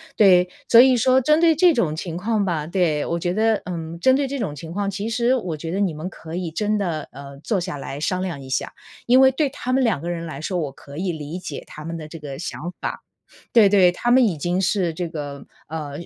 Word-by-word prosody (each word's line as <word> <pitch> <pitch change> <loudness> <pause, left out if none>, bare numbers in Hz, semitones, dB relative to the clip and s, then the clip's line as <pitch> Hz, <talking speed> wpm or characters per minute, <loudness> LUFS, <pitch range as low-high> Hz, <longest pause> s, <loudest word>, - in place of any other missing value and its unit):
对， 180 -3 +5 0.2
所 230 - +8
以 255 +1 +7
说 255 +2 +4
针 305 +5 +3
对 335 -1 +6
这 350 +1 +6
种 175 - 0
情 165 +1 -5
况 205 +3 0
吧 165 -5 -1
对， 170 -4 +1
我 170 - -2
觉 175 +1 -1
得， 220 +1 +2
嗯， 170 -2 -6
针 260 +8 +4
对 280 +1 +1
这 275 +1 -4
种 165 -11 -3
情 160 +3 -9
况， 200 +2 -2
其 200 +3 -4
实 240 +2 +2
我 180 -11 -3
觉 165 +2 -5
得 190 - -2
你 190 -5 +1
们 155 +4 -5
可 165 -2 -9
以 175 -2 -3
真 210 +5 0
的， 170 -6 -3
呃， 140 0 -10
坐 200 +6 -1
下 175 -2 -4
来 140 0 -6
商 185 +4 -1
量 175 -7 -4
一 135 - -10
下。 130 - -2 0.3
因 250 +2 +5
为 265 0 +7
对 290 +1 +1
他 255 -1 -4
们 265 0 +3
两 220 - +1
个 170 +4 -5
人 170 -1 -4
来 155 -4 -7
说， 180 +4 -3
我 150 -5 -2
可 140 +1 -14
以 180 +3 -2
理 155 +1 -6
解 155 -6 -7
他 150 - -10
们 165 +1 -5
的 155 -2 -8
这 165 - -9
个 145 -3 -8
想 175 0 -5
法。 - - -5 0.5
对 220 -4 +7
对， 190 -3 +5
他 240 +7 -1
们 255 +1 +6
已 195 -8 +1
经 175 +5 -1
是 185 -2 +1
这 170 +2 -4
个 145 -4 -7 0.2
呃， 155 -2 -5
180 Hz, 275 characters per minute, -22 LUFS, 160-220 Hz, 0.5 s, 所